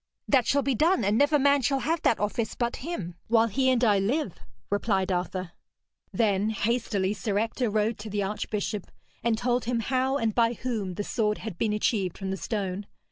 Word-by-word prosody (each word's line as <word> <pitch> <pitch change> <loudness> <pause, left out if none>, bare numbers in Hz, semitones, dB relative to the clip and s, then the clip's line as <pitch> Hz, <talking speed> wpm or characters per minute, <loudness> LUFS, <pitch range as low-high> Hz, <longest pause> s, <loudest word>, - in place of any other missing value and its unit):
'That 255 -4 +3
shall 280 0 +3
be 275 - +1
done, 320 - +3
and 205 +2 +2
never 290 +5 +4
man 280 0 +4
shall 270 +2 +1
have 325 +4 0
that 230 - +2
office 215 +2 -1
but 235 -1 -1
him, 255 - -5
while 225 0 +4
he 260 +4 +1
and 250 -1 +2
I 205 -4 +4
live,' 220 - -1 0.3
replied 200 -2 +1
Arthur. 185 0 -2 0.6
Then 210 -2 +1
hastily 210 -3 0
Sir 205 0 -2
Ector 225 +2 0
rode 215 +1 0
to 215 +1 -7
the 205 0 -1
archbishop, 210 0 -3 0.3
and 230 -1 +2
told 245 0 0
him 240 0 0
how 260 +3 +1
and 225 -4 0
by 230 +1 +3
whom 220 -6 -3
the 205 - -2
sword 210 0 0
had 215 -6 -7
been 220 - +1
achieved 210 -3 0
from 190 -1 -4
the - - -1
stone. 200 -2 -3
220 Hz, 195 wpm, -27 LUFS, 205-250 Hz, 0.6 s, never